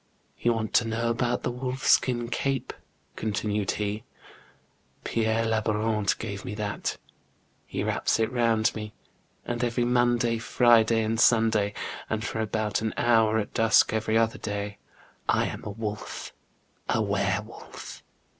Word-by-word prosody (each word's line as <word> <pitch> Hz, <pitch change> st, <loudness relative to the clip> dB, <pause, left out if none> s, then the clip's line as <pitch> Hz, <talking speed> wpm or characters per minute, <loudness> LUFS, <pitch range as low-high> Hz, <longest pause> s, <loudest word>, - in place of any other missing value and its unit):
" -, -, -38 dB
You 120 Hz, -, +3 dB
want 110 Hz, -1 st, -3 dB
to 115 Hz, -, +4 dB
know 115 Hz, +1 st, 0 dB
about 120 Hz, +1 st, 0 dB
the -, -, -1 dB
wolf 130 Hz, +2 st, -4 dB
skin 120 Hz, -2 st, +3 dB
cape? 135 Hz, +2 st, -1 dB, 0.2 s
" -, -, -40 dB
continued 105 Hz, -2 st, -1 dB
he. 105 Hz, +1 st, -3 dB, 0.5 s
" -, -, -38 dB
Pierre 115 Hz, 0 st, 0 dB
Labourant 110 Hz, -1 st, +1 dB
gave 100 Hz, -3 st, -5 dB
me 105 Hz, -, -5 dB
that; 105 Hz, -1 st, -3 dB, 0.7 s
he -, -, -3 dB
wraps -, -, +1 dB
it 110 Hz, -, +1 dB
round 115 Hz, -3 st, +2 dB
me, 105 Hz, 0 st, -7 dB, 0.5 s
and 120 Hz, 0 st, -2 dB
every 120 Hz, 0 st, +1 dB
Monday, 120 Hz, -1 st, +2 dB
Friday, 115 Hz, -1 st, +4 dB
and 110 Hz, +1 st, -1 dB
Sunday, 110 Hz, -3 st, +3 dB, 0.3 s
and 110 Hz, +1 st, -2 dB
for 110 Hz, -, -3 dB
about 110 Hz, -1 st, -1 dB
an 110 Hz, -1 st, -2 dB
hour 115 Hz, -2 st, +4 dB
at 105 Hz, -, -3 dB
dusk 115 Hz, 0 st, +4 dB
every 110 Hz, 0 st, +1 dB
other 115 Hz, 0 st, +1 dB
day, 105 Hz, 0 st, -4 dB, 0.5 s
I -, -, +3 dB
am -, -, -5 dB
a -, -, -5 dB
wolf, 105 Hz, 0 st, -5 dB, 0.6 s
a -, -, +2 dB
were 100 Hz, -1 st, +1 dB
wolf. 115 Hz, -, -10 dB
110 Hz, 155 wpm, -27 LUFS, 105-115 Hz, 0.7 s, to